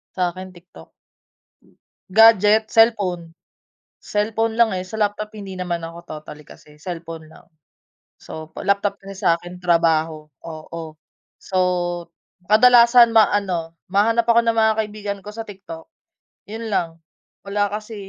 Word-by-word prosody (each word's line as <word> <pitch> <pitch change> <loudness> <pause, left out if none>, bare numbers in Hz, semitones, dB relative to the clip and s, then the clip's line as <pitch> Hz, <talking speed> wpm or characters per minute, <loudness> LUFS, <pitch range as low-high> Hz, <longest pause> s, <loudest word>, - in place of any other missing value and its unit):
Sa'kin, 185 0 -3
TikTok. 170 - -17 1.2
Gadget? 220 +1 +5
Cellphone, 200 -7 +2 0.7
cellphone 220 +2 -2
lang, 230 -1 +3
eh, 185 -1 -4
sa 185 - -11
laptop 210 0 -2
hindi 195 -3 -8
naman 175 -2 -3
ako 165 +1 -9
totally, 150 -1 -10
kasi 150 0 -17
cellphone 165 -1 -8
lang. 160 - -19 0.7
So, 160 0 -10
pa - - -9
laptop, 200 0 0
kasi 195 0 -10
sa'kin 175 +1 0
trabaho 165 -3 0 0.2
oo 165 0 -8 0.6
so 190 - -3 0.9
kadalasan 235 +1 +6
maano, 195 -6 +2 0.2
mahanap 225 +5 +2
ako 235 0 +5
ng 230 0 +1
mga 220 0 +4
kaibigan 205 -1 -6
ko 210 - -7
sa 225 +1 -7
TikTok, 185 -5 -10 0.6
yun 225 +1 -6
lang. 165 -2 -2 0.5
Wala 205 0 0
kasi 215 +1 -6
195 Hz, 125 wpm, -21 LUFS, 170-220 Hz, 1.2 s, kadalasan